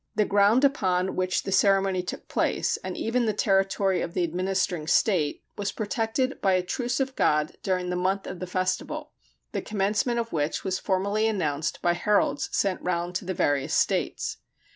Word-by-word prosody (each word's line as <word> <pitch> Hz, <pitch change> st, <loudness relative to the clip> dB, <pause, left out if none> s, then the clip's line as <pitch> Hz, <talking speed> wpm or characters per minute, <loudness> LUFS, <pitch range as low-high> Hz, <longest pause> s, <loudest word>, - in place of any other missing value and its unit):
The 210 Hz, -1 st, +3 dB
ground 205 Hz, +6 st, +4 dB
upon 190 Hz, -9 st, +1 dB
which 185 Hz, 0 st, 0 dB
the 195 Hz, -, -4 dB
ceremony 195 Hz, -2 st, +3 dB
took 180 Hz, -, -7 dB
place, -, -, 0 dB
and -, -, -6 dB
even 235 Hz, +1 st, 0 dB
the 215 Hz, -, +1 dB
territory 195 Hz, -1 st, +2 dB
of 170 Hz, -, -5 dB
the 180 Hz, -, +1 dB
administering 180 Hz, -1 st, -1 dB
state, 170 Hz, -5 st, +2 dB, 0.2 s
was 205 Hz, -1 st, -1 dB
protected 225 Hz, +4 st, -1 dB
by 195 Hz, -1 st, +3 dB
a 185 Hz, -1 st, +2 dB
"Truce 245 Hz, +7 st, -2 dB
of 265 Hz, 0 st, -1 dB
God" 150 Hz, 0 st, +1 dB
during 180 Hz, -1 st, -1 dB
the -, -, -1 dB
month 190 Hz, +2 st, 0 dB
of 180 Hz, -, -6 dB
the 185 Hz, -, -5 dB
festival, 185 Hz, +1 st, -2 dB, 0.4 s
the -, -, -2 dB
commencement 210 Hz, +4 st, 0 dB
of 230 Hz, -1 st, -3 dB
which 150 Hz, 0 st, -1 dB
was 190 Hz, 0 st, -1 dB
formally 200 Hz, +3 st, 0 dB
announced 155 Hz, -8 st, -1 dB
by 175 Hz, -, +3 dB
heralds 205 Hz, +4 st, +1 dB
sent 195 Hz, -2 st, 0 dB
round 175 Hz, 0 st, -2 dB
to 185 Hz, -, -3 dB
the 185 Hz, -, -2 dB
different 145 Hz, -4 st, +1 dB
states. -, -, 0 dB
190 Hz, 180 wpm, -26 LUFS, 180-210 Hz, 0.4 s, ground